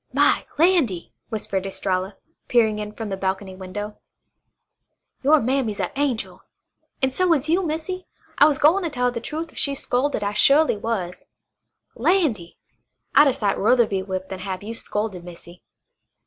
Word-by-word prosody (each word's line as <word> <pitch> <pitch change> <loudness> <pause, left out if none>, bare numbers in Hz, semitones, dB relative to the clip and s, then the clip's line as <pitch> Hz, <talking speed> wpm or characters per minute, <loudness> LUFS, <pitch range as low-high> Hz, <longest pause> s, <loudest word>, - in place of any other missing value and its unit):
"My - - +3
landy!" 305 - +2 0.2
whispered 195 -3 -3
Estralla, 190 0 -2 0.3
peering 220 -4 +2
in 210 0 -5
from 220 0 -6
the 195 - -2
balcony 190 0 -3
window. 200 +3 -7 1.2
"Your 295 +3 +5
mammy's 245 -4 -1
a - - -1
angel. 270 -5 -2 0.6
An' 265 - +3
so 365 +6 +1
is 295 -1 -1
you, 340 +4 +2
Missy. 340 +3 -4 0.3
I 290 - +8
was 295 -3 +1
gwine 335 +4 +3
tell 250 -4 -1
her 245 - +2
the 235 -1 -5
trufe 315 +5 -5
if - - -8
she'd 280 -1 +3
scolded, 255 -3 0
I 200 0 -1
su'ly 285 +5 +5
was. 200 -5 -4 0.7
Landy! 265 - 0 0.6
I'd 295 - +7
a 270 - +3
sight 205 -4 0
ruther 235 +3 +4
be 195 -3 -2
whipped 190 -1 -5
than 190 - -6
have 185 0 -5
you 220 +2 -5
scolded, 210 -5 -3
Missy." 175 0 -12
225 Hz, 160 wpm, -23 LUFS, 195-290 Hz, 1.2 s, I